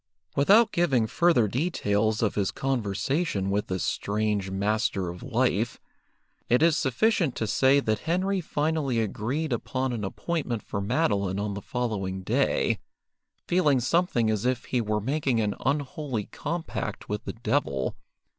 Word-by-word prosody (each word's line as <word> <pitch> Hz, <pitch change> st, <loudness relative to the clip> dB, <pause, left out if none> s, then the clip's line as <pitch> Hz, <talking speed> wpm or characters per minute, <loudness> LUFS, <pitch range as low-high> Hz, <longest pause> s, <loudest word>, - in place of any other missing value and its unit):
Without 205 Hz, +10 st, +5 dB
giving 135 Hz, -10 st, +2 dB
further 140 Hz, -1 st, +3 dB
details 110 Hz, -, 0 dB
of 105 Hz, -, +1 dB
his 100 Hz, -2 st, 0 dB
conversation 125 Hz, -, -1 dB
with 105 Hz, +1 st, 0 dB
this 95 Hz, -3 st, -2 dB
strange 105 Hz, -1 st, -1 dB
Master 100 Hz, -1 st, 0 dB
of 90 Hz, +1 st, -8 dB
Life, 120 Hz, -3 st, 0 dB, 0.7 s
it 125 Hz, +5 st, +4 dB
is 165 Hz, -2 st, +5 dB
sufficient 165 Hz, -, +1 dB
to 110 Hz, -, -1 dB
say 135 Hz, +6 st, +4 dB
that 110 Hz, -5 st, 0 dB
Henry 190 Hz, +2 st, +1 dB
finally 150 Hz, -5 st, 0 dB
agreed 125 Hz, +7 st, -1 dB
upon 130 Hz, +2 st, -2 dB
an 110 Hz, -3 st, -3 dB
appointment 120 Hz, -, -3 dB
for 100 Hz, -, -4 dB
Madeline 100 Hz, -, 0 dB
on 100 Hz, 0 st, -2 dB
the 100 Hz, -, -5 dB
following 95 Hz, -6 st, -3 dB
day, -, -, +1 dB, 0.7 s
feeling 155 Hz, -7 st, +3 dB
something 125 Hz, -4 st, +2 dB
as 105 Hz, -2 st, -1 dB
if 125 Hz, -1 st, 0 dB
he 125 Hz, -, 0 dB
were 105 Hz, -1 st, 0 dB
making 135 Hz, 0 st, 0 dB
an 105 Hz, -2 st, +1 dB
unholy 140 Hz, -4 st, -1 dB
compact 165 Hz, +2 st, -4 dB
with 105 Hz, 0 st, -4 dB
the -, -, -4 dB
devil. 110 Hz, -, -1 dB
120 Hz, 145 wpm, -27 LUFS, 105-145 Hz, 0.7 s, Without